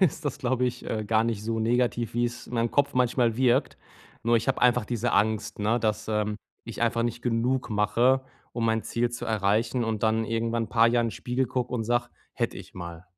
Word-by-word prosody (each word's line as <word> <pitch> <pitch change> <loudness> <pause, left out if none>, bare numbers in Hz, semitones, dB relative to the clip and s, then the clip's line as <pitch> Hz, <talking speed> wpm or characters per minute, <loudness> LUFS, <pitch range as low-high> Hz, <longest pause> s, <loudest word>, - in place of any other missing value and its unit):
ist 170 -3 +2
das, 145 - -2
glaube 125 -2 0
ich, 125 0 -3
äh, 110 -1 -2
gar 110 +1 +2
nicht 110 -3 -2
so 115 0 -1
negativ, 120 0 0
wie 120 0 +2
es 120 0 -4
in - - -8
meinem 115 0 +1
Kopf 140 0 +1
manchmal 120 -2 +2
wirkt. 130 +1 +2 0.5
Nur, 115 +1 +3
ich 115 - -1
habe 135 - 0
einfach 125 -3 +4
diese 120 -4 -1
Angst, 110 +1 +1
ne, 110 +3 +1
dass, 110 -1 -1
ähm, 105 -1 0 0.3
ich 115 - -8
einfach 115 0 +1
nicht 120 0 -2
genug 125 +2 0
mache, 115 +5 +2 0.3
um 115 - -2
mein 115 -1 +1
Ziel 120 0 -1
zu 120 0 -5
erreichen 110 +3 +1
und 110 -2 -2
dann 110 0 +2
irgendwann 115 0 -1
paar 115 -1 +4
Jahren 120 -1 +2
Spiegel 125 +4 -1
gucke 125 0 -2
und 115 - -1
sage: 120 +1 +1 0.3
„Hätte - - -2
ich - - -11
mal.“ 85 -1 -8
115 Hz, 215 wpm, -27 LUFS, 110-125 Hz, 0.5 s, einfach